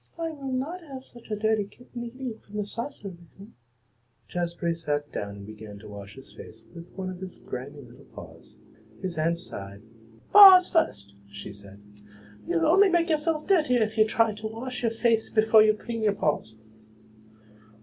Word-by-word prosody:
I 330 Hz, 0 st, -2 dB
will 275 Hz, -3 st, -6 dB
not 290 Hz, +8 st, -3 dB
have 270 Hz, -5 st, -10 dB
such 240 Hz, -1 st, -14 dB
a 215 Hz, -, -1 dB
dirty 215 Hz, 0 st, +1 dB
kitten 240 Hz, +3 st, -10 dB
eating 240 Hz, -1 st, -7 dB
from 210 Hz, +1 st, -11 dB
the 210 Hz, -, -1 dB
saucer 230 Hz, 0 st, -6 dB
with 170 Hz, -2 st, -14 dB
me." 205 Hz, +3 st, -13 dB, 0.8 s
Jazbury 170 Hz, -1 st, -2 dB
sat 145 Hz, -3 st, -3 dB
down 100 Hz, 0 st, -5 dB
and 100 Hz, 0 st, -10 dB
began 105 Hz, -1 st, -10 dB
to 105 Hz, +1 st, -13 dB
wash 100 Hz, -1 st, -10 dB
his 135 Hz, -, -14 dB
face 110 Hz, +1 st, -13 dB
with 170 Hz, +1 st, -11 dB
one 185 Hz, -1 st, -5 dB
of 180 Hz, -, -9 dB
his 185 Hz, -1 st, -8 dB
grimy 140 Hz, +3 st, -8 dB
little 125 Hz, +3 st, -16 dB
paws. -, -, -14 dB, 0.5 s
His 175 Hz, -4 st, -3 dB
aunt 165 Hz, +2 st, +1 dB
sighed. 100 Hz, -, -9 dB, 0.5 s
"Paws 385 Hz, -3 st, +10 dB
first," 100 Hz, -, 0 dB
she 100 Hz, 0 st, -9 dB
said. 100 Hz, 0 st, -14 dB, 0.7 s
"You'll 165 Hz, -1 st, +1 dB
only 390 Hz, +3 st, +5 dB
make 345 Hz, -1 st, +2 dB
yourself 310 Hz, 0 st, 0 dB
dirtier 300 Hz, -, +3 dB
if 215 Hz, 0 st, -4 dB
you 215 Hz, -1 st, +4 dB
try 225 Hz, 0 st, +2 dB
to 215 Hz, +1 st, -6 dB
wash 245 Hz, +4 st, -6 dB
your 235 Hz, -, +2 dB
face 225 Hz, 0 st, +1 dB
before 220 Hz, 0 st, +5 dB
you 215 Hz, 0 st, +4 dB
clean 230 Hz, +1 st, -6 dB
your 210 Hz, -2 st, +2 dB
paws." 130 Hz, -, -2 dB
210 Hz, 180 wpm, -26 LUFS, -, 0.8 s, Paws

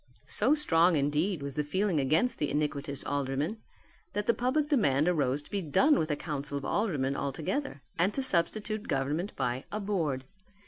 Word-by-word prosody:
So 300 Hz, -, +2 dB
strong, 175 Hz, -, +4 dB
indeed, 150 Hz, +4 st, 0 dB
was 140 Hz, -1 st, -4 dB
the 150 Hz, -, -1 dB
feeling 185 Hz, +2 st, 0 dB
against 155 Hz, -, +2 dB
the 150 Hz, -, 0 dB
iniquitous 145 Hz, -2 st, -2 dB
aldermen 145 Hz, +8 st, -1 dB, 0.5 s
that 205 Hz, 0 st, -1 dB
the 235 Hz, -, +4 dB
public 260 Hz, +6 st, +1 dB
demand 155 Hz, -, +3 dB
arose 145 Hz, -5 st, +1 dB
to -, -, -18 dB
be 200 Hz, -, -1 dB
done 270 Hz, -, +3 dB
with 155 Hz, -, -1 dB
a 150 Hz, -, +1 dB
council 145 Hz, -2 st, -4 dB
of 140 Hz, -, -5 dB
aldermen 145 Hz, -11 st, 0 dB
altogether 150 Hz, -, -3 dB, 0.2 s
and 180 Hz, +4 st, +3 dB
to 270 Hz, -, 0 dB
substitute 215 Hz, +1 st, 0 dB
government 145 Hz, +8 st, -1 dB
by 125 Hz, +2 st, -2 dB
a 210 Hz, -, -2 dB
Board. 165 Hz, -11 st, -1 dB
155 Hz, 175 wpm, -30 LUFS, 140-205 Hz, 0.5 s, strong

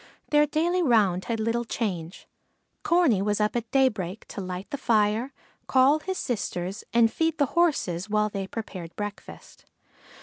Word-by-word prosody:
Their 295 Hz, 0 st, +5 dB
daily 340 Hz, +4 st, +1 dB
round 210 Hz, -, +3 dB
had 230 Hz, -1 st, -2 dB
little 230 Hz, +2 st, 0 dB
change. 185 Hz, -7 st, -4 dB, 0.5 s
Corney 335 Hz, -, +3 dB
was 205 Hz, +1 st, 0 dB
up 210 Hz, +2 st, +1 dB
at 230 Hz, -1 st, -2 dB
daybreak 220 Hz, -8 st, 0 dB
to 200 Hz, -, -6 dB
light 185 Hz, 0 st, -5 dB
the 285 Hz, -, -2 dB
fire, 225 Hz, +1 st, +1 dB, 0.4 s
call 270 Hz, +3 st, +4 dB
his 375 Hz, +4 st, -4 dB
sisters, 195 Hz, -3 st, -3 dB
and 230 Hz, -1 st, +4 dB
feed 325 Hz, 0 st, 0 dB
the 285 Hz, -, +3 dB
horses 215 Hz, -, +1 dB
while 210 Hz, 0 st, +2 dB
they 195 Hz, -2 st, -4 dB
prepared 185 Hz, -6 st, -7 dB
breakfast. 205 Hz, 0 st, -8 dB
225 Hz, 155 wpm, -26 LUFS, 200-275 Hz, 0.5 s, Their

